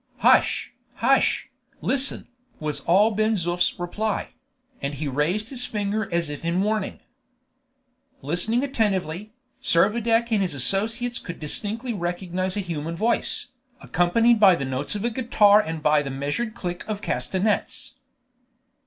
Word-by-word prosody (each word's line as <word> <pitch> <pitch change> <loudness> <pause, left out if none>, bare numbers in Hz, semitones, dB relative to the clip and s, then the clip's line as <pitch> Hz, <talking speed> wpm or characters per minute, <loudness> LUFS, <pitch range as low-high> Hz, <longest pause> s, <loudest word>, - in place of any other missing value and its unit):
"Hush, - - +3 0.2
hush! - - +2 0.3
listen!" 270 +1 +1 0.3
was 150 -1 -3
all 205 +6 +5
Ben 215 +1 +1
Zoof's 175 -1 0
reply; 205 +5 -2 0.5
and 140 +1 -3
he 150 +2 -4
raised 165 - -1
his 250 -3 -5
finger 210 0 -2
as 170 -1 0
if 145 +1 -7
in 170 +3 0
warning. 215 -1 -2 1.2
Listening 180 - +1
attentively, 210 - -1 0.3
Servadac 225 +6 +2
and 215 -3 +2
his 180 -6 -1
associates 225 - +1
could 175 - -8
distinctly 220 - -1
recognize 185 0 -3
a - - 0
human 165 -2 -4
voice, 225 +7 0 0.3
accompanied 220 +7 +2
by 195 -4 +7
the 140 - -3
notes 130 +7 -2
of 205 +2 -3
a 240 - 0
guitar 215 -4 +4
and 160 -5 -5
by 150 -1 +4
the 140 - -5
measured 145 - -3
click 175 -1 -5
of 215 -1 -4
castanets. 200 +6 -1
195 Hz, 135 wpm, -24 LUFS, 170-220 Hz, 1.2 s, by